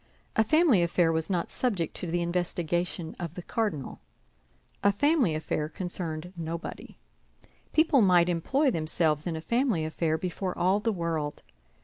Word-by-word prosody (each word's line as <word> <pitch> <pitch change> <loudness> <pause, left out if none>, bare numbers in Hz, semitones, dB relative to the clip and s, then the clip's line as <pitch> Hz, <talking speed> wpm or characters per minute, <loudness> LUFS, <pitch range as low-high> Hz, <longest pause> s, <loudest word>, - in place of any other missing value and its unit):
A 220 - +5
family 310 - +4
affair 170 -1 +2
was 160 +1 -1
not 175 -3 -1
subject 195 -11 -1
to 175 - -5
the 175 +1 0
investigation 175 -1 -2
of 170 -1 -5
the 180 - -6
cardinal; 205 -12 -2 0.8
a 200 - +5
family 270 - +2
affair 155 -1 -2
concerned 175 -1 -4
nobody. 165 0 -6 0.7
People 310 -4 +4
might 180 -4 +5
employ 260 - +1
themselves 155 -2 0
in 170 - -2
a 160 - -4
family 235 - +1
affair 160 0 0
before 180 +2 -3
all 185 +3 +3
the 225 +2 0
world. 165 -5 -3
175 Hz, 145 wpm, -28 LUFS, 160-205 Hz, 0.8 s, A